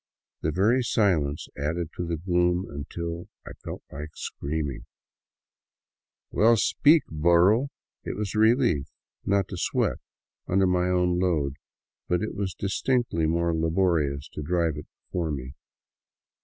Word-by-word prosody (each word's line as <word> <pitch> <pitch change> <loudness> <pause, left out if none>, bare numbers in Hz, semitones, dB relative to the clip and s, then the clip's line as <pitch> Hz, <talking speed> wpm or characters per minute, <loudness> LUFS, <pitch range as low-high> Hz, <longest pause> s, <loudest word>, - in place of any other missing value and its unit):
The 80 - 0
very 110 +10 +3
silence 85 - +1
added 80 +3 -2
to 90 - -3
the 85 -1 -1
gloom, 90 +1 +1
until 85 +4 -6 0.2
I - - -8
felt - - -7
like 75 +3 -6
screaming, 75 -2 -4 0.7
" - - -67
Well, 115 +2 +5
speak, 150 +8 +4
burro! 85 - +4 0.2
'* - - -66
It - - -4
was 105 -2 -3
a 110 - 0
relief 110 - +3 0.4
not 100 -1 +2
to 90 - -5
sweat - - 0 0.5
under 95 +1 +3
my 90 0 +2
own 90 -1 +2
load, 75 -7 0 0.5
but 90 +3 +1
it 110 - -3
was 100 -2 -3
distinctly 100 -4 0
more 85 +1 +1
laborious 80 -4 +1
to - - -7
drive 85 0 0
it 75 - -8 0.2
before 85 -3 -2
me. 65 -3 -5
85 Hz, 140 wpm, -26 LUFS, 80-95 Hz, 0.7 s, Well